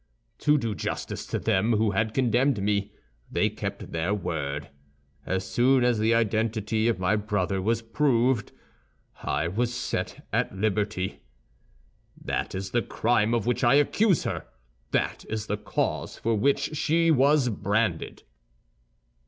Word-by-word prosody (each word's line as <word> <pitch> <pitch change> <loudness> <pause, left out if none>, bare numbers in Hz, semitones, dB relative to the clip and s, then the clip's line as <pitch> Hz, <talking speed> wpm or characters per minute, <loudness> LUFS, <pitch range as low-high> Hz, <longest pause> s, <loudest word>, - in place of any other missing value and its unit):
"To 150 0 +4
do 115 -5 -1
justice - - -4
to - - -2
them 105 +5 +1
who 110 -1 +2
had 110 +2 -1
condemned 130 0 +2
me, 100 0 0 0.4
they - - +1
kept - - -6
their 85 +5 0
word. 75 -6 -4 0.6
As 95 0 -1
soon 125 +6 +3
as 120 -3 +2
the 110 +1 +3
identity 110 0 +1
of 115 -4 +1
my 95 +3 +1
brother 100 -3 -1
was 115 +3 0
proved, 120 -2 +1 0.7
I 75 +3 -1
was 115 +7 -1
set 120 0 -4
at 95 - 0
liberty. 105 -2 -1 1.0
"That - - -3
is 95 +1 -4
the 120 - +2
crime 115 +1 +1
of 115 - -1
which 125 +2 0
I 120 +3 +5
accuse 180 +6 +3
her; - - -4 0.4
that - - -1
is 110 -1 -3
the 105 0 -2
cause 105 - -2
for 115 - 0
which 140 +7 +1
she 165 +2 +2
was 140 -1 +4
branded." 105 -4 -1
110 Hz, 145 wpm, -26 LUFS, 100-120 Hz, 1.0 s, I